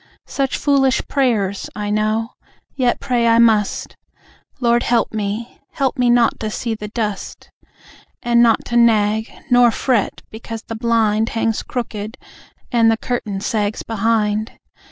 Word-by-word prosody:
Such 270 Hz, -1 st, -2 dB
foolish 275 Hz, -2 st, +2 dB
prayers! 215 Hz, -8 st, 0 dB
I 210 Hz, 0 st, -3 dB
know. 215 Hz, +2 st, 0 dB, 0.5 s
Yet 250 Hz, -3 st, +1 dB
pray 245 Hz, -4 st, 0 dB
I 230 Hz, 0 st, +4 dB
must. 220 Hz, -3 st, +2 dB, 0.6 s
Lord 240 Hz, -1 st, +2 dB
help 235 Hz, -2 st, +1 dB
me 215 Hz, +2 st, -4 dB
help 275 Hz, -4 st, 0 dB
me 250 Hz, -1 st, +2 dB
not 240 Hz, -1 st, +3 dB
to 215 Hz, -, -3 dB
see 230 Hz, +2 st, -3 dB
the 210 Hz, -1 st, -6 dB
dust! 210 Hz, -2 st, -5 dB, 0.7 s
And 235 Hz, 0 st, +3 dB
not 230 Hz, -2 st, +3 dB
to 240 Hz, -, -1 dB
nag, 220 Hz, -1 st, +3 dB, 0.2 s
nor 245 Hz, -1 st, +6 dB
fret 235 Hz, -2 st, -1 dB
because 225 Hz, 0 st, -7 dB
the -, -, -7 dB
blind 225 Hz, -1 st, +1 dB
Hangs 225 Hz, -1 st, -1 dB
crooked, 220 Hz, -2 st, -5 dB, 0.5 s
and 230 Hz, -2 st, +4 dB
the 225 Hz, -, +2 dB
curtain 215 Hz, -5 st, -3 dB
sags 210 Hz, -2 st, -1 dB
be 230 Hz, -, -7 dB
hind. 215 Hz, 0 st, 0 dB
225 Hz, 145 wpm, -19 LUFS, 215-240 Hz, 0.7 s, nor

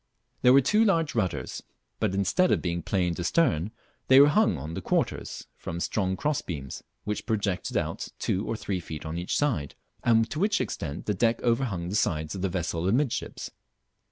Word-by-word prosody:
There 125 Hz, -, +6 dB
were 140 Hz, -, +7 dB
two 210 Hz, -, +3 dB
large 165 Hz, -9 st, +2 dB
rudders, 90 Hz, -, -2 dB, 0.4 s
but 95 Hz, -, 0 dB
instead 100 Hz, -, +2 dB
of -, -, +3 dB
being 85 Hz, -1 st, -2 dB
planed 90 Hz, 0 st, 0 dB
astern 100 Hz, -, +2 dB, 0.4 s
they 130 Hz, +1 st, +8 dB
were 145 Hz, +1 st, +8 dB
hung 150 Hz, -, +3 dB
on 75 Hz, +4 st, -6 dB
the -, -, -4 dB
quarters -, -, -1 dB
from 85 Hz, -, -6 dB
strong 95 Hz, 0 st, -1 dB
cross 150 Hz, -1 st, 0 dB
beams, 70 Hz, -6 st, -6 dB, 0.2 s
which 105 Hz, +3 st, -4 dB
projected 100 Hz, -5 st, -1 dB
out -, -, -2 dB
two 95 Hz, -, -1 dB
or 115 Hz, -, -2 dB
three 100 Hz, -4 st, -2 dB
feet 80 Hz, -3 st, -7 dB
on 80 Hz, +2 st, -3 dB
each 90 Hz, -, -1 dB
side, 120 Hz, -, 0 dB, 0.3 s
and 115 Hz, -1 st, +4 dB
to 155 Hz, -, -3 dB
which 205 Hz, +2 st, +2 dB
extent 70 Hz, -3 st, -4 dB
the 105 Hz, -, +1 dB
deck 115 Hz, +4 st, +2 dB
overhung 115 Hz, -8 st, 0 dB
the 100 Hz, -, -2 dB
sides 80 Hz, -6 st, 0 dB
of 95 Hz, -, -5 dB
the 95 Hz, -, 0 dB
vessel 85 Hz, -1 st, -2 dB
amidships. 125 Hz, +5 st, -1 dB
100 Hz, 185 wpm, -27 LUFS, 85-130 Hz, 0.4 s, they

